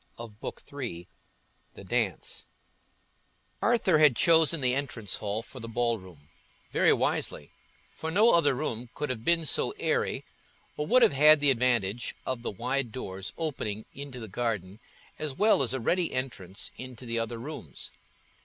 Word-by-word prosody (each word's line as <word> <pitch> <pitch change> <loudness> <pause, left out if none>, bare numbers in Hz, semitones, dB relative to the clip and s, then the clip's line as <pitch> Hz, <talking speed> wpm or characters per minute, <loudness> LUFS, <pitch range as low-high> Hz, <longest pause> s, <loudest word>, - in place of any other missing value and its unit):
Chapter 115 -2 -8
XXVI 120 -12 -6 0.7
The - - -10
Dance - - -2 1.1
Arthur 215 -9 +3
had 150 -5 +6
chosen 165 +3 +5
the 125 -2 +1
entrance 125 -7 -2
hall 105 +2 -2
for 130 - -11
the 115 - -7
ballroom: 110 -10 -3 0.5
very - - +4
wisely, - - -1 0.5
for 160 - -3
no 210 +8 +5
other 145 -5 +4
room 125 -4 -3
could 150 -2 -2
have 115 -3 -5
been 170 +1 +2
so - - +2
airy, - - 0 0.5
or 150 - -3
would 250 +1 +6
have - - +5
had 150 +2 +7
the 145 -1 +4
advantage 120 -3 0
of 130 -2 -2
the - - -3
wide 125 +4 -2
doors 95 -5 -5
opening 110 -10 -3
into 140 -2 -8
the 110 - -7
garden, 100 -2 -3 0.4
as 150 -3 -3
well 215 -3 +4
as 125 -4 +2
a 130 - -1
ready 175 +9 +1
entrance 110 -8 -4
into 125 -1 -8
the 115 -1 -1
other 115 +1 -3
rooms. 115 - -8
125 Hz, 155 wpm, -28 LUFS, 110-150 Hz, 1.1 s, had